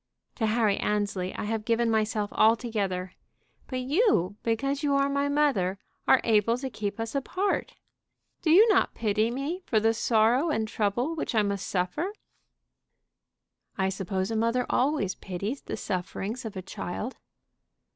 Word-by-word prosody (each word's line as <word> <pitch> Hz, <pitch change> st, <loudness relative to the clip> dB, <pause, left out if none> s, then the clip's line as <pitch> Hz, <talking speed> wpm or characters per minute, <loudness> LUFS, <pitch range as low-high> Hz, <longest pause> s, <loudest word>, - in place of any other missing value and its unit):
To 225 Hz, -, -1 dB
Harry 215 Hz, -2 st, +2 dB
Annesley 200 Hz, -3 st, -1 dB
I -, -, -4 dB
have 215 Hz, +1 st, -2 dB
given 230 Hz, +1 st, +1 dB
myself 215 Hz, -1 st, 0 dB
altogether; 210 Hz, -5 st, +1 dB, 0.5 s
but 255 Hz, -1 st, -3 dB
you, 260 Hz, -, +2 dB
because 275 Hz, +5 st, -1 dB
you 285 Hz, -2 st, +1 dB
are 275 Hz, 0 st, +3 dB
my 280 Hz, 0 st, 0 dB
mother, 270 Hz, -11 st, +1 dB, 0.3 s
are 265 Hz, -, +6 dB
able 225 Hz, +1 st, +3 dB
to 265 Hz, 0 st, -5 dB
keep 205 Hz, -1 st, -4 dB
us 225 Hz, 0 st, -3 dB
apart. 370 Hz, +8 st, -1 dB, 0.7 s
Do 320 Hz, -, 0 dB
you 390 Hz, +8 st, +8 dB
not 395 Hz, -, +3 dB
pity 215 Hz, 0 st, +1 dB
me 280 Hz, +9 st, -3 dB
for 220 Hz, -, +3 dB
the 225 Hz, +1 st, +3 dB
sorrow 235 Hz, +6 st, +3 dB
and 220 Hz, -8 st, 0 dB
trouble 230 Hz, +7 st, 0 dB
which 310 Hz, -6 st, -3 dB
I 215 Hz, -, +4 dB
must 200 Hz, -1 st, -2 dB
suffer?" 190 Hz, -, -1 dB, 1.6 s
"I 190 Hz, -1 st, +1 dB
suppose 190 Hz, +1 st, -2 dB
a -, -, -1 dB
mother 230 Hz, +3 st, +1 dB
always 265 Hz, -8 st, +1 dB
pities 200 Hz, +8 st, -5 dB
the -, -, -5 dB
sufferings 205 Hz, +5 st, -4 dB
of 215 Hz, -, -6 dB
a 185 Hz, -, -5 dB
child." 200 Hz, +6 st, -5 dB
225 Hz, 155 wpm, -27 LUFS, 205-270 Hz, 1.6 s, you